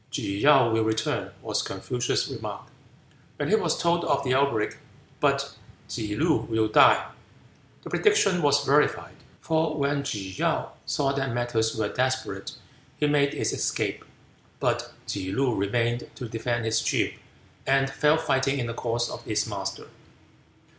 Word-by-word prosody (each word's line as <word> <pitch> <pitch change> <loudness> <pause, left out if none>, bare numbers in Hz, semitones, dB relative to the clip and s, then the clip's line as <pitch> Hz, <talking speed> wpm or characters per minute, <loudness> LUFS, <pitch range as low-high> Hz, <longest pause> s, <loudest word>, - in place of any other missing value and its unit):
"Tsze 100 0 -3
kaou 135 -5 +6
will 110 0 +2
return," 110 0 -1
was - - 0
Confucius' 125 0 -2
remark, - - -6 0.7
when - - -2
he - - +5
was - - +1
told 170 0 +1
of 140 - +1
the 130 -1 +1
outbreak, 130 -5 +1 0.4
"but - - +1 0.3
Tsze 105 -1 -4
loo 160 +1 +3
will 110 -1 +2
die." 110 - +5 0.7
The - - -9
prediction 200 - +3
was 145 -1 +3
verified. 150 +2 +2 0.3
For 160 -1 0
when 140 0 +1
Tsze 100 -8 -5
kaou - - 0 0.2
saw 140 -2 +1
that 135 -3 -2
matters 120 -2 0
were 110 -2 0
desperate 130 +4 -2 0.4
he 150 - +1
made 145 -1 +2
his - - -1
escape; - - -1 0.6
but - - -1
Tsze 95 0 -3
loo 130 -2 +2
remained 115 +4 0
to 125 - -6
defend 115 +1 -2
his 110 0 +1
chief, - - 0 0.5
and 135 0 +3
fell 150 +3 +3
fighting 135 -3 +1
in 125 - -1
the 115 - -4
cause 120 0 -1
of - - -7
his 110 -1 0
master. 95 -2 -5
125 Hz, 155 wpm, -26 LUFS, 110-140 Hz, 0.7 s, kaou